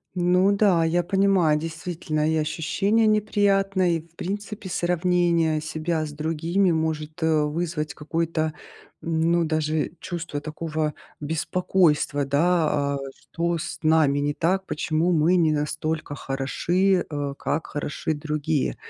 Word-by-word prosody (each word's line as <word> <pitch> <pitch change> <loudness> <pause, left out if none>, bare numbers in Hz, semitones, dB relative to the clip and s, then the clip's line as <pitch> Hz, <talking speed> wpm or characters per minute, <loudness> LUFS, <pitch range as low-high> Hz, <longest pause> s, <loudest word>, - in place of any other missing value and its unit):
Ну 180 +2 +3
да, 195 -5 +3
я 170 +2 +1
понимаю, 190 -5 +3
действительно, 160 -1 -2
и 160 - +1
ощущение 185 +8 +1
неприятное, 195 -3 +2
и, 165 - +1
в 165 0 -25
принципе, 205 +1 -5
сравнение 175 -3 +1
себя 160 0 -2
с 150 - -7
другими 165 +5 0
может, 160 -1 -2
э, 155 -2 +3
вызвать 155 -1 -3
какое-то, 160 0 -1 0.5
ну, 165 +1 +1
даже 155 0 -1
чувство 170 -4 -5
такого 155 0 -3 0.3
беспокойства. 155 -2 +1
Да, 145 -1 +1
э, 135 - -6
что 170 0 -2
с - - -5
нами 155 -3 +3
не 145 +1 0
так? 190 +5 0
Почему 160 +3 0
мы 165 +3 +3
не 160 -3 +3
настолько 155 +1 -2
хороши, 175 +8 0
э, 145 -2 -3
как 160 +2 -2
хороши 145 +1 -3
другие? 150 -1 -1
160 Hz, 125 wpm, -24 LUFS, 155-180 Hz, 0.5 s, Ну